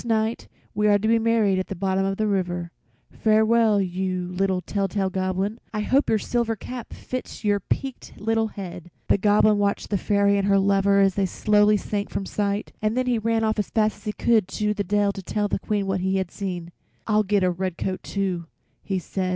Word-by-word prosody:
"This - - -14
night 220 0 0 0.3
we 210 +1 +1
are 205 -1 +5
to 210 +2 -2
be 230 0 +4
married 220 -4 +2
at 185 - -3
the 195 - -5
bottom 190 +1 0
of 195 0 -1
the 215 - 0
river. 175 -4 -1 0.4
Farewell, 220 0 +3
you 185 -1 -2
little 190 0 0
tell 195 +2 -2
tale 190 0 -1
Goblin. 190 +4 -1 0.2
I 210 - 0
hope 270 +7 +2
your 220 - +4
silver 230 +1 -1
cap 245 +2 -8
fits 255 -2 -6
your 205 -1 +2
peaked 265 +5 -4
little 225 +1 +1
head." 180 -4 -8 0.2
The - - +4
Goblin 210 +1 +4
watched 200 +1 -1
the 200 - +1
Fairy 200 0 +2
and 195 - 0
her 200 0 +4
lover 200 0 +3
as 195 -1 +4
they 195 0 +1
slowly 210 +2 +3
sank 205 0 -3
from 195 - -3
sight, 205 +1 -2
and 215 +2 0
then 255 - +1
he 245 -2 +1
ran 225 +1 0
off 220 0 0
as 210 - -1
fast 215 -2 +1
as - - -20
he 210 - -2
could 220 -5 +2
to 210 +1 -1
the 205 -1 -2
dell 205 +1 +1
to 195 - -7
tell 205 +3 -1
the - - -1
Queen 205 0 -1
what 190 -1 -1
he 190 +1 0
had 190 -2 -2
seen. 180 -4 -5 0.3
"I'll 215 -1 +3
get 205 -1 +1
a 180 - +3
red 180 -1 -3
coat, 185 -1 -3
too," 185 -4 -3 0.3
he 195 -2 -2
said. 185 +1 -3
200 Hz, 225 wpm, -24 LUFS, 190-215 Hz, 0.4 s, are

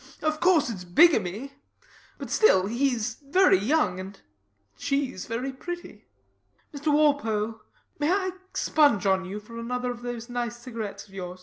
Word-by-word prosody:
Of 310 0 0
course 325 -8 +3
it's 190 -5 -7
bigamy; 225 - +3 0.6
but - - -8
still 190 - +5
he's 235 -1 -1
very 290 - +4
young; 210 - +1
and 190 +1 -8 0.6
she's 275 - -2
very 250 +4 -3
pretty. 345 +6 -8 0.7
Mr 290 +1 -1
Walpole: 225 -8 +1 0.4
may 295 +3 +1
I 375 -1 +1 0.2
spunge 285 -11 +3
on 190 -1 +2
you 195 +3 -5
for 230 +2 -10
another 250 +1 -2
of 240 -1 -8
those 240 -1 -5
nice 240 -1 -3
cigarets 230 -5 -7
of 195 - -20
yours? 180 -1 -7
240 Hz, 145 wpm, -26 LUFS, 210-290 Hz, 0.7 s, still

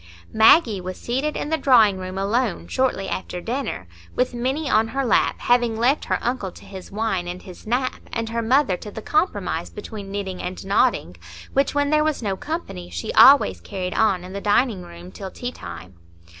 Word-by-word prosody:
Maggie 220 - +5
was 185 +1 -6
seated 270 +5 -2
in - - -3
the 320 0 0
drawing 225 -8 +5
room, 185 0 -6
alone, 210 +2 -1
shortly 255 -7 0
after 180 -1 -4
dinner, 230 - -4 0.3
with 250 0 0
Minny 265 +6 -2
on 220 -3 +3
her 270 +4 -2
lap, 235 - +2
having 240 -2 +2
left 250 +6 +2
her - - 0
uncle 240 -6 -2
to - - -14
his 190 -2 -10
wine 200 -4 -1
and 180 +1 -6
his 185 +2 -12
nap, 255 +3 -1
and 230 -1 -3
her 230 0 -1
mother 250 -3 +3
to 210 - -9
the 215 +1 -8
compromise 315 +4 -1
between 205 -3 -8
knitting 195 -2 -4
and 185 +1 -6
nodding, 195 - +1 0.4
which, 275 +1 +1
when 285 0 +1
there 305 0 +4
was 310 -5 -1
no 195 -2 -1
company, 240 - -6
she 85 -1 -5
always 95 -3 +7
carried 180 - -4
on 195 -5 +2
in 185 +1 -9
the 200 - -5
dining 210 0 +2
room 175 +1 -11
till 195 -1 -7
tea 245 +5 -5
time. 85 - -10
220 Hz, 195 wpm, -22 LUFS, 185-255 Hz, 0.4 s, always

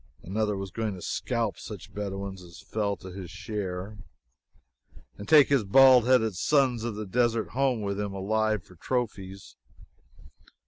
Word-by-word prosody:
Another 105 +2 -1
was 95 -1 -6
going 110 -1 -3
to 90 - -10
scalp 115 -4 -2
such 105 -6 -9
Bedouins 100 -2 -5
as 85 -2 -13
fell 105 -2 -2
to 95 - -10
his 90 -2 -8
share, 100 +1 -5 1.2
and 100 - -10
take 150 -3 +7
his 140 -5 +3
bald 125 +3 +6
headed 115 -5 +3
sons 130 0 +2
of 115 -2 -3
the 105 0 -5
desert 115 +2 0
home 130 -4 0
with 100 0 -2
him 100 -1 -2
alive 105 +1 0
for - - -18
trophies. 100 -4 -4
105 Hz, 150 wpm, -27 LUFS, 95-115 Hz, 1.2 s, take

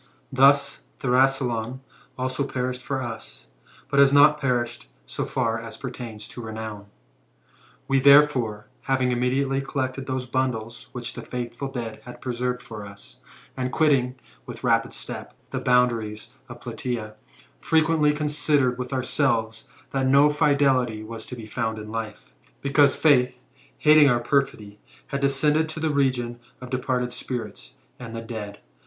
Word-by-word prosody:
Thus 140 +1 +4
Thrasyleon 130 -2 +1 0.4
also 130 +2 -1
perished 125 -1 -3
for 135 -1 -3
us, 115 -2 -8 0.4
but 140 0 +1
has 140 -1 +7
not 145 +1 +6
perished 120 - -1 0.2
so - - -4
far 115 -3 -1
as 115 0 -8
pertains 120 -4 -7
to 120 - -8
renown 110 -2 -7 1.0
We, 135 0 +3
therefore, 135 -7 +5 0.2
having 130 -1 +2
immediately 135 +2 +1
collected 135 -1 -3
those 130 -1 -2
bundles 120 -3 -3
which 120 -1 -5
the - - -7
faithful 125 +2 -5
dead 115 -5 -6
had 125 - -11
preserved 125 0 -3
for 110 -2 -8
us, 100 0 -12 0.4
and 130 -1 -2
quitting, 135 -5 +2 0.3
with - - -9
rapid - - +2
step, - - -7 0.2
the - - -2
boundaries 120 -3 +1 0.2
of 120 0 -10
Platsea, 120 -2 -4 0.5
frequently 160 - +3
considered 150 -4 +1
with 125 +2 -4
ourselves, 120 -3 0 0.2
that 135 -1 0
no 140 +3 +6
fidelity 135 -7 +2
was 110 0 -8
to 125 - -7
be 115 -3 -9
found 110 0 -2
in 105 0 -8
life; 110 - -6 0.3
because 140 0 +4
Faith, 125 -5 +3 0.4
hating 150 -1 +6
our 120 -1 +3
perfidy, 120 -5 -1 0.3
had 140 -1 -2
descended 150 +3 +2
to 160 - -6
the 160 -1 0
region 125 -4 0 0.2
of 125 -1 -10
departed 125 -1 -1
spirits, 110 - -6 0.2
and 115 -2 -8
the 115 - -4
dead. 105 -3 -6
125 Hz, 145 wpm, -24 LUFS, 115-140 Hz, 1.0 s, has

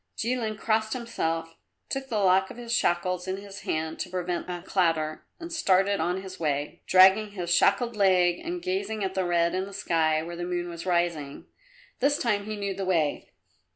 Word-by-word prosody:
Jilin 230 -2 -1
crossed 220 0 0
himself, 165 -9 -3 0.3
took 270 0 -4
the 220 - -1
lock 190 -1 +3
of - - -10
his 235 -1 -4
shackles 180 -3 +1
in 190 +1 -2
his 200 -1 -9
hand 160 -1 -3
to 180 - -3
prevent 180 -1 -3
a 175 -1 -5
clatter 165 -4 0
and 335 0 -7
started 200 - +2
on 180 +2 -1
his 185 -1 -9
way, 145 -2 -2
dragging 190 +3 +6
his 175 -3 -1
shackled 235 +6 +3
leg 180 -3 +3
and 350 +1 -5
gazing 370 - -2
at 190 -1 -2
the 190 -1 0
red 170 -1 +2
in 185 +1 -1
the 200 - -10
sky 160 -4 +1
where 170 +1 -6
the 175 - -5
moon 175 0 -2
was 170 +2 -7
rising. 170 -5 -1 0.5
This 285 +3 +3
time 210 -6 0
he 215 0 -4
knew 200 -1 -2
the 195 +1 -4
way. 165 -6 0
185 Hz, 190 wpm, -27 LUFS, 175-215 Hz, 0.5 s, dragging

